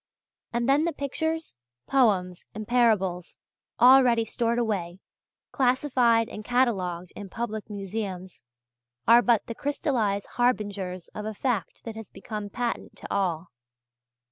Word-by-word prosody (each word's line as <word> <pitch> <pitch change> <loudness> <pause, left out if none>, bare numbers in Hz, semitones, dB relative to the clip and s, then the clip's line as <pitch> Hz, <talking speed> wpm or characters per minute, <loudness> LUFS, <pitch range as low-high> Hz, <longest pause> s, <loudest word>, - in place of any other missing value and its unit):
And 235 0 -1
then 285 +4 +4
the 340 - -1
pictures, 320 +3 -3 0.3
poems, 195 -10 +1
and 215 -1 -6
parables 210 -8 +1 0.4
already 245 -3 +6
stored 235 +1 -1
away, 195 -7 -1 0.5
classified 250 -3 +2
and 215 - -8
catalogued 190 -8 0
in 205 -2 -8
public 220 0 -5
museums, 195 -2 -5 0.7
are 235 +1 +8
but 235 -3 +2
the 230 - -5
crystallized 230 -7 -1
harbingers 200 -7 -1
of 210 - -7
a 215 - -5
fact 235 -5 -2
that 225 -2 -7
has 225 -2 -9
become 205 +1 -6
patent 240 +3 -3
to - - -7
all. 175 -3 -1
225 Hz, 125 wpm, -26 LUFS, 195-245 Hz, 0.7 s, are